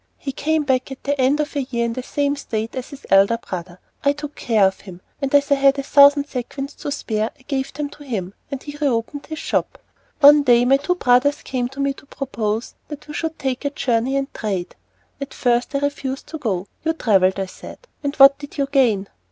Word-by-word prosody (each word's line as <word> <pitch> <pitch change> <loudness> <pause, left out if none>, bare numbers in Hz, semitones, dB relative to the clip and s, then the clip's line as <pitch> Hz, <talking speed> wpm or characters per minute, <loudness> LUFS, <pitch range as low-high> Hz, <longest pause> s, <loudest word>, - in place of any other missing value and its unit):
He 275 - -5
came 310 +3 0
back 260 -1 0
at 270 - -9
the 285 -1 0
end 270 +4 +3
of 300 +1 -2
a 285 - +1
year 240 -3 -2
in 230 - -2
the 255 - -4
same 285 +2 -1
state 225 -5 -4
as 255 -1 -5
his 280 -3 -12
elder 195 +4 +5
brother. 180 -4 -7 0.2
I 280 - +3
took 295 0 -7
care 220 -4 +2
of 190 0 0
him, 180 -3 -11 0.2
and 275 -1 -1
as 285 0 +3
I - - +8
had 275 0 +4
a 275 - -2
thousand 285 +1 +6
sequins 275 +1 -5
to 290 - -6
spare 220 -5 -2
I 260 - -23
gave 265 0 -3
them 295 -1 -4
to 295 - -13
him, 200 -9 -4 0.2
and 275 -2 -6
he 290 -1 -8
re 295 -1 +1
opened 245 +3 -2
his 315 - -6
shop. - - -2 0.4
One 295 0 +8
day, 245 -3 +4
my 270 +2 +5
two 360 +6 -1
brothers 275 -1 +2
came 250 -2 -2
to 270 +1 -12
me 275 0 +1
to 280 - -17
propose 230 -5 -3
that 295 -1 -9
we 300 - -8
should 320 +1 -3
make 260 0 -1
a 285 - 0
journey 255 -1 0
and 275 0 -3
trade. 195 -5 -3 0.5
At 275 - -6
first 245 +2 0
I - - +2
refused 275 -2 -3
to 315 - -6
go. 195 -9 -2 0.2
"You 320 +1 +1
travelled," 195 - +2
I 195 - -1
said, 185 - -11 0.3
"and 285 0 -2
what 275 0 +7
did 285 0 -10
you 280 - +1
gain?" 225 -8 +2
270 Hz, 235 wpm, -21 LUFS, 230-285 Hz, 0.5 s, I